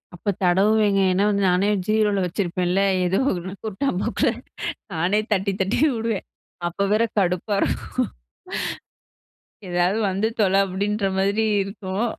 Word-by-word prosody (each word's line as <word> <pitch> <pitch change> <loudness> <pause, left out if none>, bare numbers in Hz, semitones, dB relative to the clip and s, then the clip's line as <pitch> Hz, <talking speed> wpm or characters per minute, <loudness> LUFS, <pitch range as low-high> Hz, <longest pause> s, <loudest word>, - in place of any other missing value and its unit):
அப்போ 175 - -3
தடவுவேங்க. 200 +3 +3
ஏன்னா 185 +2 +2
வந்து, 200 -1 +1
நானே 185 +3 +2 0.2
ஜீரோல 215 -2 +2
வச்சிருப்பேன்ல 180 0 0 0.2
ஏதோ 180 +2 +1 0.5
குருட்டாம் 215 0 -1
போக்குல 230 +3 +1 0.6
நானே 175 +6 +1
தட்டி, 200 0 0
தட்டி 195 +3 0 0.2
உடுவேன். 225 -3 -2 0.4
அப்போ 175 +3 -2
வேற 220 +2 +3 0.2
கடுப்பா 185 +2 0
இருக்கும். - - -1 1.6
ஏதாவது 175 +3 +1
வந்து 195 +3 0
தொலை 195 -2 +4
அப்டின்ற 200 +2 -1
மாரி 200 +3 +2 0.2
இருக்கும். 195 +2 -3
195 Hz, 120 wpm, -23 LUFS, 185-210 Hz, 1.6 s, தொலை